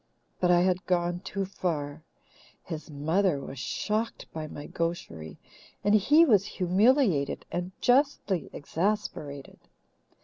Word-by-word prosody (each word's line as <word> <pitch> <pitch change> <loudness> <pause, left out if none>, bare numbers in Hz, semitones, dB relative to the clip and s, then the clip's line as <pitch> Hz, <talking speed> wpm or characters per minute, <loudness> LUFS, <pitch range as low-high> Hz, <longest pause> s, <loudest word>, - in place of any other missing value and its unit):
But 180 - +2
I 175 0 +5
had 185 0 +1
gone 175 -1 +1
too 195 +1 -3
far; 160 -6 -3 0.6
his 160 -2 -7
mother 160 +3 +1
was 135 -1 -8
shocked 215 - -2
by 155 -1 -4
my 145 -1 -8
gaucherie, 125 - -4 0.5
and 205 - +3
he 290 - +6
was 210 - +5
humiliated 190 - +2
and 175 +1 -3
justly 250 - +2
exasperated. 155 -5 -3
180 Hz, 115 wpm, -28 LUFS, 155-205 Hz, 0.6 s, he